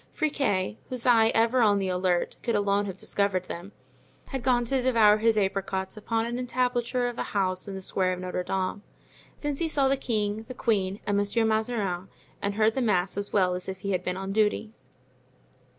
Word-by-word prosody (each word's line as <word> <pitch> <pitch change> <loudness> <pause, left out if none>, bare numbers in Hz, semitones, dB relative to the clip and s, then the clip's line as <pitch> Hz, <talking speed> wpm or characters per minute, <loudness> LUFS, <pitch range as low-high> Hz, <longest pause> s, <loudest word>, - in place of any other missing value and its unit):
Friquet, 265 -11 0
whose 250 -2 -2
eye, 230 -3 +6
ever 230 +3 +3
on 205 -3 +4
the 195 -1 -1
alert, 180 -1 0
could 235 - -1
alone 205 0 +1
have 190 -1 -6
discovered 200 -2 0
them, 180 +2 -8 0.6
had 265 -2 -3
gone 245 -1 +2
to 265 +2 +1
devour 225 -5 +5
his 225 0 +3
apricots 190 -1 -1
upon 225 +1 -1
the 245 - -2
entablature 250 0 0
of 240 -1 -5
a - - -4
house 185 0 0
in 195 - -5
the 190 - -6
square 185 0 0
of 180 - -5
Notre 180 0 -3
Dame. 190 +2 -2 0.6
Thence 290 -2 -2
he 330 - 0
saw 280 -3 +3
the 275 +1 +2
king, 215 -3 -2
the 255 - -7
queen 200 -5 0
and 205 -1 +1
Monsieur 205 +3 +2
Mazarin, 215 -5 -1 0.3
and 200 0 -1
heard 220 +1 +3
the 265 - -1
mass 195 -5 +1
as 200 0 -3
well 185 -3 +3
as 180 +1 -5
if 190 0 -6
he 200 - -2
had 180 -1 0
been 180 0 -2
on 195 0 -4
duty. 215 +1 +1
210 Hz, 200 wpm, -27 LUFS, 190-240 Hz, 0.6 s, eye